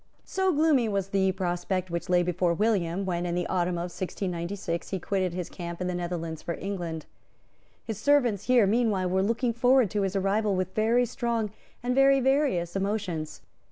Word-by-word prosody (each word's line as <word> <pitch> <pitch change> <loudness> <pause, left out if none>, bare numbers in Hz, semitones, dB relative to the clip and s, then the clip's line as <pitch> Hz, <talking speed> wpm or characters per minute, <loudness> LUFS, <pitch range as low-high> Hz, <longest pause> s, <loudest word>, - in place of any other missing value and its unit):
So 380 0 +1
gloomy 295 -7 +3
was 195 -2 -1
the 190 -1 +2
prospect 185 0 -2
which 170 +2 -3
lay 180 -1 +4
before 175 -1 +1
William, 195 -2 0
when, 175 -2 -1
in 170 - -2
the 175 0 -1
autumn 180 -1 0
of 175 0 -4
1696, 175 -1 -4
he 195 - -2
quitted 185 -1 -1
his 180 -2 -3
camp 170 -2 -7
in 180 - -2
the 180 - -1
Netherlands 170 -2 -4
for 170 - -4
England. 175 -5 -4 0.8
His 220 -3 -4
servants 245 -6 +2
here 250 -4 +5
meanwhile 210 -3 +1
were 190 +1 +2
looking 230 +4 0
forward 245 -2 +4
to 210 - 0
his 195 0 -1
arrival 200 +1 +1
with 185 0 -2
very 230 +3 +3
strong 235 -3 -2 0.3
and 250 +1 0
very 275 +1 +5
various 265 - +1
emotions. 195 -6 -2
195 Hz, 180 wpm, -27 LUFS, 175-225 Hz, 0.8 s, here